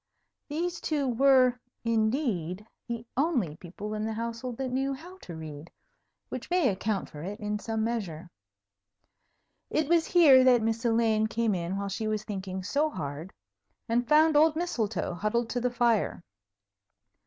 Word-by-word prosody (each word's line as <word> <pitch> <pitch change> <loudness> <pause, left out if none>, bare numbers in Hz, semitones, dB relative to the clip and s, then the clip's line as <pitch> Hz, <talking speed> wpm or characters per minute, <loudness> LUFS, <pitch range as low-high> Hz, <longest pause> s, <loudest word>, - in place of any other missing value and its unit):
These 340 +4 -3
two 290 -3 0
were, 255 0 +4 0.2
indeed, 220 - 0 0.2
the 235 -1 -4
only 255 - +1
people 200 +5 -7
in 215 0 -2
the 220 0 -2
household 230 +2 -4
that 265 -1 -2
knew 270 +2 0
how 360 +7 -12
to 170 - -9
read, 155 0 -8 0.6
which - - -6
may 355 -6 +3
account 200 0 -2
for 150 - -9
it 200 +6 -6
in 210 0 -2
some 220 0 -2
measure. 185 -8 -3 1.4
It 310 -2 0
was 335 0 +3
here 290 -8 +7
that 250 -3 +5
Miss 225 0 -1
Elaine 225 -2 +3
came 225 -1 0
in 180 +1 -2
while 200 0 -3
she 215 +3 -3
was 215 -1 -1
thinking 190 -3 -5
so 290 +10 +1
hard, 155 - -6 0.6
and 235 +1 +1
found 310 +1 +5
old 310 +1 +5
Mistletoe 225 - -2
huddled 220 +6 -1
to 245 - -1
the 250 - +1
fire. 235 -6 +1
230 Hz, 155 wpm, -28 LUFS, 200-265 Hz, 1.4 s, here